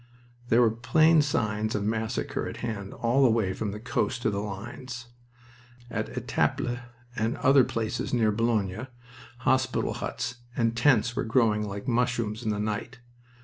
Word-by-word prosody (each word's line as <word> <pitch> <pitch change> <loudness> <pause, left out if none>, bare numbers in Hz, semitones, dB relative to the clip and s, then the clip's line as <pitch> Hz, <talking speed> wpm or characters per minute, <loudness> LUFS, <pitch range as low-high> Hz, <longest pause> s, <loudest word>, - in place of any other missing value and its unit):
There 115 +2 +5
were 115 - +4
plain 155 +7 +4
signs 110 -6 0
of 105 - -1
massacre 110 +1 -2
at - - -6
hand 100 -4 -4
all 120 +4 +1
the 130 - +6
way 110 -5 +1
from 105 - -3
the 105 +1 -5
coast 120 +1 -1
to 110 - +2
the 100 - -2
lines. 120 +5 -6 0.9
At - - -2
Etaples 120 0 0 0.4
and 110 +2 -1
other 135 0 +5
places 115 +1 -2
near 115 -3 +3
Boulogne 110 0 0 0.5
hospital 130 +1 +1
huts 125 - -4 0.2
and 115 -1 +1
tents 120 -2 +3
were - - 0
growing 110 -2 +2
like 100 0 -6
mushrooms 120 -3 0
in 110 - -2
the 105 - 0
night. 105 +3 -3
115 Hz, 155 wpm, -27 LUFS, 105-125 Hz, 0.9 s, the